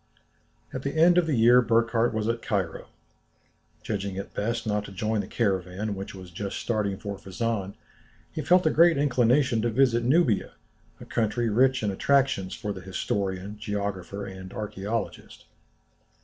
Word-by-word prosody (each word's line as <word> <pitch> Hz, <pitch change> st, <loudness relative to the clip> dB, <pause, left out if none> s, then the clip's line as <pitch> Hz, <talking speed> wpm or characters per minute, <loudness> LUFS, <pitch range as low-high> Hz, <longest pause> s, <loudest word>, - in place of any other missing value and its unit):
At 130 Hz, -, -4 dB
the 140 Hz, +3 st, -3 dB
end 175 Hz, +2 st, +6 dB
of 170 Hz, -, 0 dB
the 145 Hz, -6 st, +1 dB
year 120 Hz, +2 st, +6 dB
Burckhardt 115 Hz, 0 st, +2 dB
was 110 Hz, -1 st, -2 dB
at 115 Hz, 0 st, -1 dB
Cairo. 95 Hz, -6 st, -2 dB, 1.0 s
Judging 100 Hz, -2 st, -3 dB
it 100 Hz, -, -6 dB
best 115 Hz, +3 st, -2 dB
not 105 Hz, -1 st, 0 dB
to -, -, -10 dB
join 110 Hz, +2 st, -1 dB
the 95 Hz, -, -8 dB
caravan 100 Hz, -1 st, -1 dB
which 95 Hz, 0 st, -7 dB
was 90 Hz, -2 st, -10 dB
just 100 Hz, +3 st, -5 dB
starting 105 Hz, -4 st, -1 dB
for 100 Hz, 0 st, -6 dB
Fezzan, 100 Hz, 0 st, -3 dB, 0.6 s
he 155 Hz, -, -4 dB
felt 180 Hz, +2 st, +4 dB
a 155 Hz, -, +4 dB
great 170 Hz, -1 st, +5 dB
inclination 130 Hz, -2 st, +3 dB
to 120 Hz, -, +1 dB
visit 120 Hz, 0 st, +3 dB
Nubia, 130 Hz, -, +2 dB, 0.5 s
a -, -, -10 dB
country 115 Hz, +1 st, 0 dB
rich 130 Hz, +2 st, +3 dB
in 105 Hz, -, +1 dB
attractions 130 Hz, -4 st, +1 dB
for 105 Hz, -2 st, -4 dB
the 95 Hz, -, -9 dB
historian, 95 Hz, +2 st, -3 dB
geographer, 100 Hz, -2 st, -4 dB
and 95 Hz, -1 st, -8 dB
archæologist. 105 Hz, +2 st, -5 dB
110 Hz, 160 wpm, -26 LUFS, 100-125 Hz, 1.0 s, end